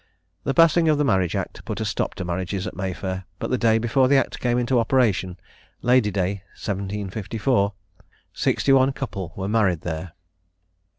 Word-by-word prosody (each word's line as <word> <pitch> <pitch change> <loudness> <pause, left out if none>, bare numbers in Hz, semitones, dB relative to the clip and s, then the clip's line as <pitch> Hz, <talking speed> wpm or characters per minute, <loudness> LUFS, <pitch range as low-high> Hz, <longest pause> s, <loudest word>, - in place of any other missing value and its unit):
The 135 - 0
passing 165 0 +5
of 150 - +3
the 145 - +2
Marriage 95 -8 +1
Act - - -4
put - - -5
a - - -2
stop - - -2
to 95 - -4
the - - -6
marriages 95 +2 -3
at - - -6
May 95 0 -2
Fair; 95 0 -5
but - - -4
the 130 - +2
day 110 -1 +4
before 120 +3 +2
the 140 +1 +5
Act - - -1
came 120 -1 +1
into 125 0 +2
operation 110 -7 +1 0.5
(Lady 125 -3 +4
day 100 0 -1 0.2
1754) 100 +2 -1 0.6
sixty 135 - +2
one 135 0 +4
couple 100 - -5
were 95 0 -3
married 100 -6 +2
there. 85 0 -5
105 Hz, 180 wpm, -23 LUFS, 95-130 Hz, 0.6 s, passing